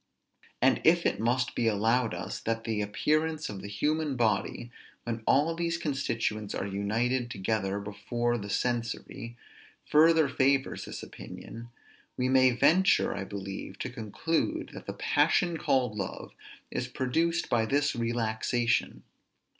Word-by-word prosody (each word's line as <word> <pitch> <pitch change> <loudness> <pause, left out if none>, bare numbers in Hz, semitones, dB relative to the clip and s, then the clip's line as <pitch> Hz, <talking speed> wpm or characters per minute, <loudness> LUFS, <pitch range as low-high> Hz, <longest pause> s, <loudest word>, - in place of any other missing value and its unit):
And 130 - +4
if 170 +1 +4
it - - +1
must 125 +3 +1
be 120 - 0
allowed 115 +3 +2
us, - - -5
that 115 0 -2
the 110 -2 -1
appearance 155 +9 0
of 100 -2 -6
the 100 - -7
human 150 +7 0
body, 120 0 0 0.3
when 115 -1 -3
all 150 +5 +4
these 170 0 -1
constituents 115 -9 -2
are - - -2
united 115 +6 -1
together 100 -1 -1
before 120 +4 -2
the 100 -1 -7
sensory, 115 +2 -3 0.5
further 160 0 +5
favors 135 0 +1
this - - -7
opinion, 115 +1 -9 0.5
we 125 0 +1
may 130 0 +6
venture, 170 +10 +4
I 95 - -4
believe, 95 -1 -6
to - - -4
conclude 165 - -2
that - - -10
the - - -3
passion 175 -3 +2
called 125 -7 +1
love 100 -3 -5 0.4
is - - -2
produced 165 +6 0
by 115 -2 +1
this 145 +3 +2
relaxation. 115 +1 0
120 Hz, 140 wpm, -29 LUFS, 110-145 Hz, 0.5 s, may